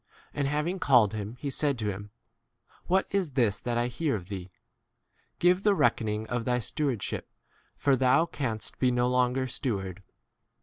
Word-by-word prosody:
And 140 Hz, -1 st, 0 dB
having 150 Hz, +6 st, -1 dB
called 120 Hz, -, +4 dB
him, 105 Hz, +1 st, -5 dB
he 140 Hz, +2 st, -4 dB
said 140 Hz, 0 st, +1 dB
to 110 Hz, -2 st, -1 dB
him, 100 Hz, +2 st, -8 dB, 0.8 s
What 190 Hz, +2 st, +3 dB
[is] 190 Hz, -8 st, 0 dB
this 115 Hz, -6 st, +2 dB
that 120 Hz, -1 st, -2 dB
I 120 Hz, -, +2 dB
hear 130 Hz, +3 st, -1 dB
of 95 Hz, -2 st, -7 dB
thee? 95 Hz, -2 st, -6 dB, 0.9 s
give 180 Hz, +2 st, +3 dB
the 205 Hz, -1 st, +3 dB
rec -, -, +3 dB
koning 110 Hz, -1 st, -2 dB
of 120 Hz, +1 st, -2 dB
thy 125 Hz, +1 st, +1 dB
stewardship, 125 Hz, 0 st, -2 dB, 0.5 s
for 140 Hz, -1 st, +3 dB
thou 130 Hz, +5 st, +4 dB
3 -, -, -17 dB
canst 115 Hz, -6 st, -3 dB
be 130 Hz, -, +3 dB
no 125 Hz, 0 st, +2 dB
longer 125 Hz, +1 st, +2 dB
steward. 100 Hz, -8 st, -3 dB
125 Hz, 175 wpm, -28 LUFS, 110-145 Hz, 0.9 s, called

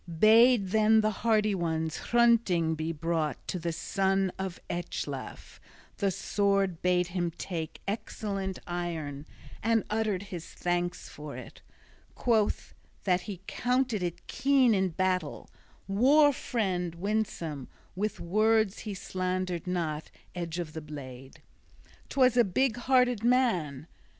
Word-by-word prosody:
Bade 220 Hz, +1 st, +6 dB
then 220 Hz, +1 st, +4 dB
the 215 Hz, 0 st, +1 dB
hardy 215 Hz, -2 st, +3 dB
one 160 Hz, -3 st, -1 dB
Hrunting 220 Hz, -5 st, +2 dB
be 160 Hz, +1 st, -2 dB
brought 160 Hz, -3 st, -2 dB
to 180 Hz, -, -2 dB
the 170 Hz, 0 st, -2 dB
son 190 Hz, +2 st, 0 dB
of 190 Hz, -2 st, -4 dB
Ecglaf, 175 Hz, 0 st, -5 dB, 0.4 s
the 200 Hz, -, +1 dB
sword 195 Hz, -2 st, 0 dB
bade 180 Hz, -1 st, +2 dB
him 175 Hz, -1 st, -1 dB
take, 165 Hz, -4 st, -5 dB
excellent 195 Hz, -2 st, -3 dB
iron, 160 Hz, -5 st, -4 dB, 0.3 s
and 225 Hz, 0 st, +2 dB
uttered 215 Hz, -3 st, 0 dB
his 180 Hz, -4 st, -7 dB
thanks 175 Hz, 0 st, -2 dB
for 150 Hz, -1 st, -8 dB
it, -, -, -11 dB, 0.5 s
quoth 220 Hz, -4 st, +1 dB, 0.3 s
that 180 Hz, -2 st, +2 dB
he 190 Hz, -3 st, -6 dB
counted 250 Hz, -3 st, 0 dB
it 175 Hz, -2 st, -4 dB
keen 270 Hz, -4 st, +3 dB
in 190 Hz, -2 st, +2 dB
battle, 180 Hz, -2 st, -2 dB, 0.4 s
"war 280 Hz, +9 st, +5 dB
friend" 185 Hz, -9 st, -2 dB
winsome: 170 Hz, -7 st, -2 dB, 0.3 s
with 210 Hz, +3 st, -2 dB
words 215 Hz, +3 st, +2 dB
he 210 Hz, -3 st, -5 dB
slandered 185 Hz, -2 st, -3 dB
not 160 Hz, -4 st, -2 dB, 0.2 s
edge 170 Hz, -2 st, -4 dB
of 165 Hz, -3 st, -4 dB
the 160 Hz, -, -5 dB
blade: 135 Hz, -3 st, -10 dB, 0.7 s
'twas 255 Hz, -3 st, +4 dB
a 240 Hz, -, +6 dB
big 230 Hz, +5 st, +1 dB
hearted 250 Hz, -2 st, +2 dB
man! 185 Hz, -, +1 dB
190 Hz, 125 wpm, -29 LUFS, 170-220 Hz, 0.7 s, Bade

